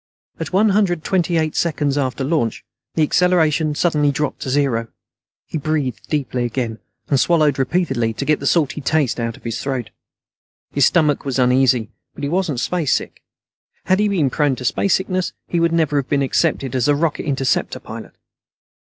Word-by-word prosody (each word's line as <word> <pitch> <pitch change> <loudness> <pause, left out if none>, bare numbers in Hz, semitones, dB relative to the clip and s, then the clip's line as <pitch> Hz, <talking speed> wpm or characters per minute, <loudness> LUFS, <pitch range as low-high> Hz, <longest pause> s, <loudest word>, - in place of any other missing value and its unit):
At - - -4
one 205 +4 +4
hundred 190 -5 +1
twenty 175 -2 +1
eight 155 -1 0
seconds 150 -4 0
after 135 -1 -1
launch, 135 -5 -1 0.3
the 160 - +3
acceleration 160 -2 +2
suddenly 150 -3 +2
dropped 145 0 -2
to - - -5
zero. 130 -4 +1 0.6
He 160 - -4
breathed 145 -5 -2
deeply 130 -5 -1
again, 120 -2 -3 0.3
and 140 - +3
swallowed 155 -4 +3
repeatedly 135 -5 0
to 140 - -4
get 155 0 +2
the 140 - -2
salty 150 -2 +1
taste 145 -4 +1
out 115 -1 -3
of - - -20
his 115 -1 -4
throat. 125 -5 -3 0.8
His 140 -3 +4
stomach 150 -4 +2
was 135 -2 -2
uneasy, 125 -2 +3 0.2
but - - -9
he 140 - -1
wasn't 170 -6 0
spacesick. 165 +1 -1 0.6
Had 185 +1 +2
he 210 - +3
been 165 -10 +1
prone 145 -2 +1
to 125 - -7
spacesickness, 185 - 0
he 175 - 0
would 165 0 +2
never 160 -3 +1
have 135 -2 -1
been 140 -1 +2
accepted 135 -1 0
as 125 0 +1
a 145 - +4
Rocket 155 +1 -1
Interceptor 135 -2 0
pilot. - - -9
145 Hz, 175 wpm, -20 LUFS, 130-165 Hz, 0.8 s, one